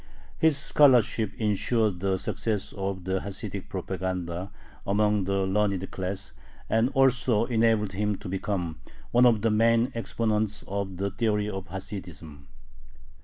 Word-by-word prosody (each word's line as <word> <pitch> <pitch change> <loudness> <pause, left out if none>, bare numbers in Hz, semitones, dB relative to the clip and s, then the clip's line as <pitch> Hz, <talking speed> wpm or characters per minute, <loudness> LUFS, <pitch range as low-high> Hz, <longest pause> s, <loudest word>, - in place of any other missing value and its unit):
His 160 -3 +4
scholarship 125 -7 +4
insured 105 -2 +1
the 95 0 0
success 105 +2 -2
of 95 -2 -3
the 95 +1 -1
Hasidic 100 -1 -6
propaganda 95 -1 -3 0.4
among 105 0 +2
the 100 0 0
learned 95 -1 0
class, 95 +1 -5 0.3
and 115 +3 +2
also 125 -4 +3
enabled 110 -3 +2
him 105 +1 -1
to - - -9
become 90 -3 -3 0.3
one 125 +1 +6
of 110 -3 +3
the 115 - +3
main 115 +3 +3
exponents 110 -2 -1
of 100 -2 -3
the 100 +1 -1
theory 105 -1 0
of 95 -2 -5
Hasidism. 85 -7 -8
100 Hz, 130 wpm, -27 LUFS, 95-110 Hz, 0.4 s, one